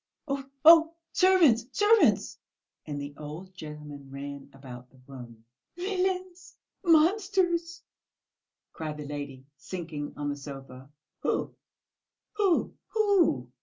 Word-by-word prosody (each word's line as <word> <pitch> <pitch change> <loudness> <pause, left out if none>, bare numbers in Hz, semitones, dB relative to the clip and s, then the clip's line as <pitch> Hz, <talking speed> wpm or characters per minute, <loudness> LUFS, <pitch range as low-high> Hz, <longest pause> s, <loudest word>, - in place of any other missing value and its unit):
Oh, 275 -1 -3 0.2
oh, 330 0 +8 0.2
servants, 345 -12 +5
servants!" 425 +2 +3 0.5
and 145 -1 -4
the 145 0 -6
old 160 +5 -9
gentleman 150 -4 -9
ran 140 0 -8
about 125 -2 -11
the 130 - -22
room. 120 -4 -12 0.3
"Villains! 370 -1 -3 0.3
Monsters!" 345 0 +2 0.9
cried 155 -2 -5
the 150 - -7
lady, 140 -2 -7
sinking 155 -2 -6
on 145 0 -2
the 145 - -2
sofa. 135 -2 -10 0.3
"Who, - - -2 0.8
who, 405 -5 +1
who?" 370 - +2
160 Hz, 105 wpm, -28 LUFS, -, 0.9 s, oh